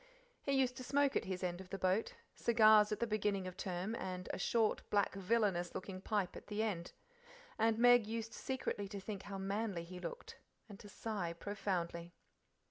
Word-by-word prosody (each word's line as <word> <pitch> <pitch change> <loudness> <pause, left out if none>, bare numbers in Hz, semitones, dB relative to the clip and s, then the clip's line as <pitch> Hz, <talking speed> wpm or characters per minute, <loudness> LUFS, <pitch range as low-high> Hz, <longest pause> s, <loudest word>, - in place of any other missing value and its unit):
He 275 - -1
used 260 -2 +2
to 255 - -6
smoke 280 +1 +2
at - - +1
his 185 -1 -3
end 175 0 -2
of 185 - -12
the 195 - -3
boat 185 +3 +1 0.2
cigars 215 -2 +6
at 210 - -1
the 235 - +2
beginning 210 -3 0
of 185 -1 -6
term 185 +2 -3
and 185 -4 -4
a - - -4
short, 225 +3 +2
black, 205 -2 +2
villainous 195 -3 +1
looking 185 0 -5
pipe 200 -3 -1
at - - -10
the 210 +1 -1
end 180 -6 -3 0.7
and 225 0 +3
Meg 245 -2 +6
used 225 0 -4
secretly 255 -6 -3
to 200 0 -6
think 195 0 -5
how 200 -1 -6
manly 195 -2 -2
he 180 +1 -8
looked, 485 - -7 0.3
and 205 -2 -11
to 205 - -11
sigh 200 -6 -3
profoundly. 175 -3 -3
205 Hz, 190 wpm, -37 LUFS, 185-225 Hz, 0.7 s, cigars